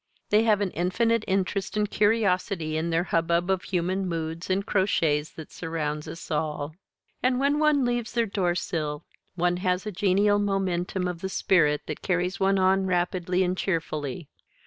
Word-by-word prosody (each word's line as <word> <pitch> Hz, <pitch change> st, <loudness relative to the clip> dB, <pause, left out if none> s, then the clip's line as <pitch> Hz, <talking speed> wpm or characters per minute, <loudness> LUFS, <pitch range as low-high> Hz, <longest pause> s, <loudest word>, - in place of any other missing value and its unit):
They 210 Hz, +1 st, +5 dB
have 210 Hz, -2 st, +3 dB
an 195 Hz, -3 st, 0 dB
infinite 225 Hz, +6 st, +1 dB
interest 195 Hz, +1 st, -1 dB
and 210 Hz, 0 st, +2 dB
curiosity 195 Hz, -6 st, +1 dB
in 160 Hz, +2 st, -1 dB
the 165 Hz, +1 st, +1 dB
hubbub 170 Hz, +1 st, +1 dB
of 190 Hz, -1 st, +1 dB
human 185 Hz, +1 st, -1 dB
moods 165 Hz, +1 st, -4 dB
and 195 Hz, +2 st, 0 dB
crotchets 160 Hz, -8 st, +1 dB
that 160 Hz, -, -9 dB
surrounds 150 Hz, -2 st, -3 dB
us 165 Hz, -, -8 dB
all. 150 Hz, -1 st, -2 dB, 0.5 s
And 255 Hz, 0 st, +2 dB
when 285 Hz, +2 st, +2 dB
one 300 Hz, -3 st, +3 dB
leaves 240 Hz, -1 st, -1 dB
their 235 Hz, -1 st, +2 dB
doorsill 175 Hz, -6 st, -2 dB, 0.3 s
one 175 Hz, 0 st, +1 dB
has 180 Hz, +1 st, 0 dB
a 210 Hz, -, -3 dB
genial 205 Hz, +2 st, +2 dB
momentum 190 Hz, -2 st, -1 dB
of 175 Hz, -2 st, -5 dB
the 190 Hz, -, -3 dB
spirit 150 Hz, -6 st, +2 dB
that 155 Hz, -, -6 dB
carries 180 Hz, +1 st, -1 dB
one 195 Hz, 0 st, +3 dB
on 190 Hz, 0 st, +3 dB
rapidly 180 Hz, 0 st, 0 dB
and 180 Hz, 0 st, 0 dB
cheerfully. 165 Hz, -4 st, -3 dB
185 Hz, 165 wpm, -26 LUFS, 165-200 Hz, 0.5 s, They